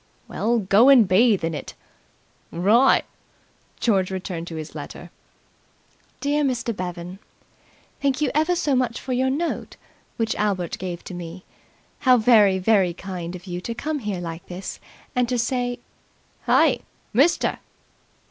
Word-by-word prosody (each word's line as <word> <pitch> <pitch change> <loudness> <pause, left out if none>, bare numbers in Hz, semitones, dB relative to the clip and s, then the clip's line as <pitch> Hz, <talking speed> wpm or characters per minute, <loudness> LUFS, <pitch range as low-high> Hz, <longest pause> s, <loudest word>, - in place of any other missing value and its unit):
"Well, 235 +2 0
go 210 +4 +5
and 250 -7 +7
bathe 205 +1 +4
in 165 0 -1
it." 150 - -7 0.8
"Wri'!" 215 +10 +4 0.8
George 195 -5 +2
returned 180 -3 -5
to 165 - -7
his 155 -1 -7
letter. - - -9 1.1
"DEAR 290 +1 +1
MR. 240 -4 -1
BEVAN, 180 0 -6 0.8
"Thank 275 -2 +1
you 300 - +1
ever 315 +4 +2
so 290 -5 +1
much 250 -2 0
for 255 - -4
your 260 +1 +1
note, 320 +6 -3 0.4
which 225 -1 0
Albert 195 -5 -1
gave 180 -2 -5
to - - -8
me. 175 +1 -8 0.6
How 255 -3 +5
very, 215 -4 +5
very 190 -3 +2
kind 180 -2 -6
of 180 +1 -10
you 180 -1 -5
to 230 +4 -5
come 300 +4 -3
here 205 -6 -4
like 170 +1 -7
this 185 +2 -7 0.4
and 250 -1 +1
to 250 - 0
say... 245 +1 -1 0.7
"Hey, - - +4 0.3
mister!" 280 +10 +2
210 Hz, 145 wpm, -23 LUFS, 180-250 Hz, 1.1 s, and